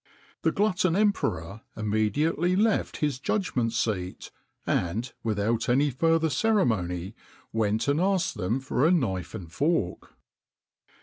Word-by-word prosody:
The -, -, +2 dB
glutton 190 Hz, -4 st, +1 dB
emperor 110 Hz, -, 0 dB, 0.2 s
immediately 125 Hz, -, +1 dB
left 215 Hz, +2 st, +1 dB
his 140 Hz, -4 st, -2 dB
judgment 135 Hz, -, 0 dB
seat, 100 Hz, -6 st, -2 dB, 0.3 s
and, 110 Hz, +9 st, -1 dB
without 110 Hz, +2 st, 0 dB
any 140 Hz, +4 st, +3 dB
further 165 Hz, +4 st, +2 dB
ceremony, 100 Hz, -, +1 dB, 0.4 s
went 110 Hz, +1 st, 0 dB
and 145 Hz, +3 st, +2 dB
asked 190 Hz, -1 st, +1 dB
them 105 Hz, +4 st, -1 dB
for 130 Hz, 0 st, -1 dB
a 160 Hz, -, +5 dB
knife 100 Hz, -, 0 dB
and 90 Hz, -6 st, -8 dB
fork. 140 Hz, -, -1 dB
125 Hz, 120 wpm, -27 LUFS, 105-165 Hz, 0.4 s, a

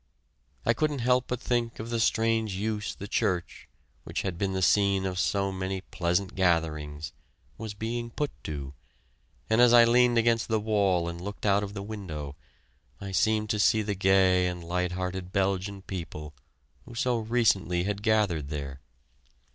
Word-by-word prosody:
I -, -, +4 dB
couldn't 150 Hz, +4 st, 0 dB
help 125 Hz, 0 st, +3 dB
but 125 Hz, -, -2 dB
think 120 Hz, -2 st, -1 dB
of 115 Hz, +2 st, -6 dB
the 115 Hz, -, 0 dB
strange 110 Hz, -2 st, +1 dB
use 105 Hz, +1 st, -2 dB
the 100 Hz, -, -8 dB
church 90 Hz, -3 st, -2 dB, 0.3 s
which -, -, -4 dB
had 95 Hz, -3 st, -2 dB
been 95 Hz, +2 st, -1 dB
the 95 Hz, 0 st, -1 dB
scene 100 Hz, -1 st, +3 dB
of 90 Hz, -1 st, -2 dB
so 100 Hz, 0 st, +1 dB
many 95 Hz, 0 st, -3 dB
pleasant 90 Hz, +1 st, -1 dB
gatherings 80 Hz, -5 st, 0 dB, 0.5 s
was 110 Hz, -2 st, -6 dB
being 115 Hz, +2 st, -3 dB
put 145 Hz, +5 st, -2 dB
to, 70 Hz, -3 st, -5 dB, 0.7 s
and 110 Hz, +2 st, +3 dB
as 120 Hz, -1 st, +6 dB
I 120 Hz, -1 st, +9 dB
leaned 120 Hz, 0 st, +4 dB
against 115 Hz, 0 st, +2 dB
the 110 Hz, -1 st, +1 dB
wall 100 Hz, -5 st, +1 dB
and 85 Hz, 0 st, -5 dB
looked 100 Hz, +3 st, -6 dB
out 100 Hz, 0 st, +4 dB
of 100 Hz, 0 st, -6 dB
the 100 Hz, -, -4 dB
window, 85 Hz, -10 st, -6 dB, 0.6 s
I 100 Hz, -1 st, -6 dB
seemed 110 Hz, +1 st, +1 dB
to 105 Hz, -, -1 dB
see 110 Hz, +1 st, +4 dB
the 105 Hz, 0 st, -1 dB
gay 95 Hz, -1 st, +4 dB
and 90 Hz, -1 st, -4 dB
light 90 Hz, +1 st, -1 dB
hearted 90 Hz, 0 st, -4 dB
Belgian 95 Hz, 0 st, -1 dB
people 80 Hz, -5 st, -6 dB, 0.5 s
who 120 Hz, -, -11 dB
so 120 Hz, 0 st, +1 dB
recently 105 Hz, -7 st, +1 dB
had 100 Hz, +1 st, -2 dB
gathered 105 Hz, -9 st, +1 dB
there. 70 Hz, -3 st, -5 dB
100 Hz, 170 wpm, -28 LUFS, 90-110 Hz, 0.7 s, I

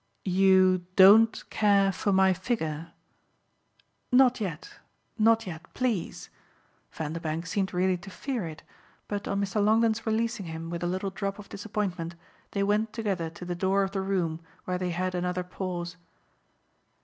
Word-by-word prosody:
"You 185 Hz, -1 st, +4 dB
DON'T 215 Hz, +4 st, +6 dB
care 200 Hz, -2 st, +3 dB
for 200 Hz, +2 st, -1 dB
my 190 Hz, 0 st, +4 dB
figure?" 165 Hz, -5 st, -3 dB, 1.2 s
"Not 250 Hz, -1 st, +5 dB
yet 175 Hz, -6 st, -5 dB, 0.4 s
not 225 Hz, +1 st, +4 dB
yet. 175 Hz, -1 st, -8 dB
PLEASE." 240 Hz, -8 st, -2 dB, 0.6 s
Vanderbank 160 Hz, +1 st, -4 dB
seemed 190 Hz, +2 st, -1 dB
really 185 Hz, +1 st, +1 dB
to 175 Hz, +2 st, -11 dB
fear 235 Hz, -2 st, -4 dB
it, 155 Hz, -1 st, -9 dB, 0.4 s
but 205 Hz, -1 st, -4 dB
on 200 Hz, -, -1 dB
Mr. 200 Hz, +1 st, 0 dB
Longdon's 225 Hz, +1 st, +2 dB
releasing 220 Hz, -3 st, -1 dB
him 165 Hz, +1 st, -6 dB
with 170 Hz, -1 st, -4 dB
a 175 Hz, -, -1 dB
little 190 Hz, +2 st, -2 dB
drop 195 Hz, +1 st, -3 dB
of 205 Hz, -1 st, -11 dB
disappointment 195 Hz, -5 st, -3 dB, 0.3 s
they 200 Hz, -, -1 dB
went 210 Hz, +2 st, +1 dB
together 195 Hz, -7 st, -2 dB
to 170 Hz, +2 st, -10 dB
the 175 Hz, -, -3 dB
door 190 Hz, +2 st, +1 dB
of 195 Hz, -, -2 dB
the 195 Hz, -1 st, -2 dB
room, 180 Hz, -5 st, -1 dB, 0.3 s
where 180 Hz, 0 st, -2 dB
they 180 Hz, -1 st, -1 dB
had 185 Hz, +2 st, -2 dB
another 180 Hz, 0 st, -1 dB
pause. 180 Hz, -1 st, -5 dB
190 Hz, 150 wpm, -28 LUFS, 175-205 Hz, 1.2 s, DON'T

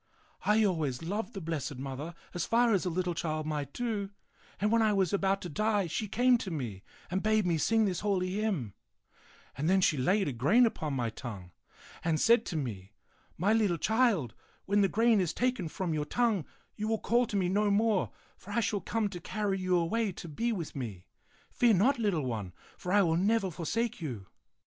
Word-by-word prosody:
I 215 Hz, +1 st, +5 dB
always 155 Hz, -8 st, -1 dB
loved 210 Hz, +6 st, -3 dB
the 195 Hz, -, -4 dB
Blessed 155 Hz, -4 st, -3 dB
Mother 135 Hz, +5 st, -6 dB, 0.2 s
as 175 Hz, -, -2 dB
far 235 Hz, 0 st, +3 dB
as 195 Hz, -1 st, +1 dB
a -, -, +1 dB
little 180 Hz, +1 st, -1 dB
child 155 Hz, -2 st, -2 dB
might 150 Hz, -3 st, -3 dB
do, 215 Hz, -3 st, -2 dB, 0.5 s
and 210 Hz, +2 st, +1 dB
when 230 Hz, 0 st, +4 dB
I 215 Hz, -1 st, +3 dB
was 190 Hz, -3 st, +1 dB
about 195 Hz, 0 st, +1 dB
to -, -, -4 dB
die, 210 Hz, +3 st, +1 dB
she 190 Hz, +6 st, -3 dB
came 245 Hz, +4 st, +3 dB
to 190 Hz, -, -5 dB
me 120 Hz, -, -4 dB, 0.3 s
and 190 Hz, +1 st, 0 dB
bade 215 Hz, -1 st, +2 dB
me 170 Hz, -3 st, +1 dB
sing 225 Hz, +6 st, +3 dB
this 185 Hz, -4 st, -1 dB
holy 185 Hz, -3 st, 0 dB
hymn; 190 Hz, -, -1 dB, 0.8 s
and 150 Hz, +5 st, -1 dB
then 190 Hz, +1 st, +4 dB
she 165 Hz, -5 st, +3 dB
laid 185 Hz, +10 st, +2 dB
a -, -, 0 dB
grain 145 Hz, -, +4 dB
upon 155 Hz, -, -2 dB
my 120 Hz, -3 st, -1 dB
tongue 105 Hz, -7 st, -8 dB, 0.5 s
and 160 Hz, -2 st, +1 dB
said 230 Hz, 0 st, +4 dB
to 175 Hz, -, -4 dB
me, 105 Hz, -8 st, -5 dB, 0.2 s
* -, -, -35 dB, 0.2 s
My 200 Hz, +5 st, +2 dB
little 210 Hz, -6 st, +2 dB
child, 215 Hz, -, +2 dB, 0.3 s
when 205 Hz, +1 st, +3 dB
the 195 Hz, -, +4 dB
grain 225 Hz, +1 st, +3 dB
is 175 Hz, -2 st, -1 dB
taken 250 Hz, -8 st, 0 dB
from 170 Hz, +1 st, -3 dB
your 150 Hz, -1 st, -1 dB
tongue, 225 Hz, -, +1 dB, 0.3 s
you 215 Hz, -, -3 dB
will 225 Hz, 0 st, +1 dB
call 240 Hz, +3 st, +2 dB
to 210 Hz, -, -5 dB
me 185 Hz, -2 st, +1 dB
no 205 Hz, +3 st, +2 dB
more, 205 Hz, -1 st, +2 dB, 0.3 s
for -, -, -15 dB
I 235 Hz, -, +2 dB
shall 205 Hz, -3 st, 0 dB
come 225 Hz, -1 st, -1 dB
to 180 Hz, -3 st, -7 dB
carry 200 Hz, +2 st, -2 dB
you 185 Hz, -1 st, +2 dB
away 200 Hz, +5 st, 0 dB
to 170 Hz, -, -8 dB
be 230 Hz, +10 st, -1 dB
with 175 Hz, -8 st, -4 dB
me. 110 Hz, -10 st, -6 dB, 0.5 s
Fear 235 Hz, -3 st, +4 dB
not, 245 Hz, +8 st, +3 dB
little 190 Hz, -, 0 dB
one, 105 Hz, -7 st, -4 dB, 0.2 s
for 180 Hz, -, -5 dB
I 205 Hz, 0 st, +5 dB
will 165 Hz, -2 st, +2 dB
never 195 Hz, +1 st, +2 dB
forsake 220 Hz, +7 st, -2 dB
you. 120 Hz, -11 st, -5 dB
190 Hz, 210 wpm, -30 LUFS, 155-215 Hz, 0.8 s, I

